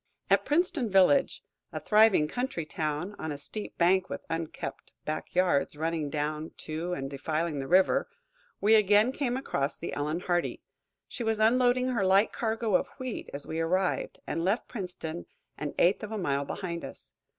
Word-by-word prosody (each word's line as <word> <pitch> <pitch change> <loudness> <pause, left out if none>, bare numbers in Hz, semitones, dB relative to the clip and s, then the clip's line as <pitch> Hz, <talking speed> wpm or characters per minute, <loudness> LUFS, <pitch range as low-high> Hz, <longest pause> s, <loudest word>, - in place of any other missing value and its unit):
At - - +4
Princeton 315 - +1
village, 195 +8 +4 0.3
a - - -4
thriving 210 -7 +5
country 245 - -3
town 155 +5 -3
on 160 - -3
a 145 - -4
steep 205 +9 -6
bank, 185 +2 +3
with - - -6
unkempt 165 -1 -5
backyards 155 0 0
running 160 -1 -2
down 150 +2 -3
to 160 +3 -3
and 135 -5 -3
defiling 155 +3 -2
the 135 - -4
river, 185 - +3 0.5
we 215 +2 +4
again 210 +2 +5
came 260 -3 -1
across 140 - -2
the - - -5
"Ellen 150 +4 -2
Hardy." 175 -2 -1 0.4
She 245 - -5
was 225 -1 0
unloading 250 +3 +3
her 235 -6 0
light 195 +3 +4
cargo 225 -2 -1
of - - +2
wheat 255 -3 -5
as 140 0 -7
we 160 - -4
arrived, 180 +3 0
and 165 - -2
left 200 +7 0
Princeton 180 -5 -6 0.3
an 150 -1 -5
eighth 180 +3 +3
of 215 0 -6
a 220 - -2
mile 140 -7 0
behind 170 +1 -4
us. - - -8
180 Hz, 170 wpm, -29 LUFS, 155-220 Hz, 0.5 s, thriving